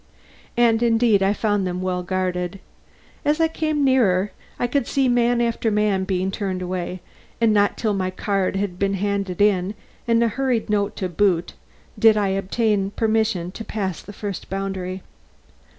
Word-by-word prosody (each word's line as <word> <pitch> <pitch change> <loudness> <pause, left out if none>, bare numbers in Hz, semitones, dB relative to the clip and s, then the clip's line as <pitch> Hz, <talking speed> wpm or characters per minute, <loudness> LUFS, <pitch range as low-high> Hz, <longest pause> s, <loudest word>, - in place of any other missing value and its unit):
And 230 -1 +4
indeed 225 -3 +3
I 195 +1 +3
found 205 -2 0
them 180 0 -3
well 180 -1 -1
guarded. 180 0 -2 0.6
As 300 +2 +1
I 325 - +4
came 310 -2 -1
nearer, 210 -7 +3 0.3
I - - 0
could 245 0 0
see 270 -1 +1
man 245 0 +3
after 230 -1 0
man 210 -3 +1
being 190 0 -1
turned 190 -3 -3
away, 180 0 -4 0.4
and 230 -2 +4
not 205 -1 +2
till 215 -3 0
my 185 -2 -1
card 195 0 -1
had 195 -2 -2
been 195 0 +1
handed 200 -2 -2
in, 200 -1 +2 0.3
and 230 0 +3
a - - +3
hurried 245 -2 -1
note 205 -1 0
to 185 - -2
boot, 180 -1 +1 0.5
did 220 -2 +6
I 205 -2 +1
obtain 195 +1 0
permission 220 -5 0
to 225 - -7
pass 195 -6 -3
the 205 - -11
first 205 -2 -6
boundary. 190 -1 -4
200 Hz, 165 wpm, -22 LUFS, 185-225 Hz, 0.6 s, did